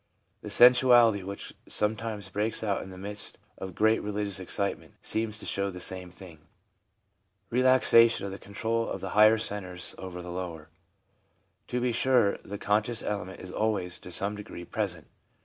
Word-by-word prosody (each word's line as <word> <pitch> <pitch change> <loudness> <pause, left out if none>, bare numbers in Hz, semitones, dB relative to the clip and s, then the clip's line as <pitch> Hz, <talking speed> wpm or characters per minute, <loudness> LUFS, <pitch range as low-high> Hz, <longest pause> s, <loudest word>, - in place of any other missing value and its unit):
The - - -7
sensuality 120 -3 +6
which 100 +2 -7
sometimes 105 -2 -2
breaks 105 +3 -2
out 100 -3 0
in - - -9
the 95 - -10
midst 100 +2 -2 0.2
of 95 -2 -7
great 110 +1 +3
religious 105 -2 -3
excitement 100 +2 -4
seems 110 -1 -2
to - - -7
show 100 0 -1
the 90 -1 -8
same 90 0 -1
thing 90 -3 -13 0.6
— - - -47
relaxation 120 -3 +4
of 100 - -5
the 95 - -8
control 115 +3 -2
of - - -4
the 95 - -5
higher 110 +3 +6
centres 95 -4 -4
over 90 -1 -7
the 90 - -7
lower. 85 -4 -6 1.0
To 125 - -2
be 125 0 0
sure, 120 -3 +2
the 100 - -7
conscious 105 +3 0
element 95 -3 -4
is 90 - -8
always 95 -5 -1
to - - -11
some 100 +3 +3
degree 100 -4 -9
present. 95 -7 -3
100 Hz, 165 wpm, -28 LUFS, 95-110 Hz, 1.0 s, sensuality